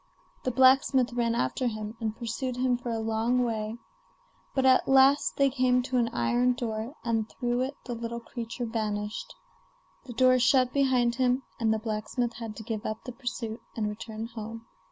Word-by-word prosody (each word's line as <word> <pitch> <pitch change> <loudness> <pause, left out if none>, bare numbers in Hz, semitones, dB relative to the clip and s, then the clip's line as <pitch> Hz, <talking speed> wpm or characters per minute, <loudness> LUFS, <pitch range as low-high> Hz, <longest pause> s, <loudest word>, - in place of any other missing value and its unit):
The - - +2
blacksmith 260 0 +4
ran 235 -1 +1
after 235 - 0
him, 215 -1 -4
and 220 -1 -3
pursued 245 +2 -3
him 250 0 +2
for 240 0 -5
a 230 - -1
long 225 +3 +1
way; 220 -1 -2 0.8
but 265 -1 +2
at 260 -1 +5
last 270 +2 +5
they 275 -1 +4
came 250 -1 +2
to 255 0 -1
an 235 -1 +3
iron 240 - +2
door, 230 +2 -4
and 225 -2 0
through 245 -1 -1
it 270 +2 -3
the 245 - -4
little 235 0 -4
creature 235 +1 -5
vanished. 215 -2 -3 0.7
The 245 - -8
door 255 +1 +5
shut 255 +1 +4
behind 255 -4 +3
him, 255 0 +2 0.2
and 225 -2 +2
the 220 - +2
blacksmith 220 +2 -2
had 225 -2 -7
to 220 - -8
give 220 -1 -4
up 215 +1 -4
the 250 - -6
pursuit 235 -3 -5
and 215 -2 -1
return 220 +1 -5
home. 225 0 -8
235 Hz, 180 wpm, -28 LUFS, 220-255 Hz, 0.8 s, at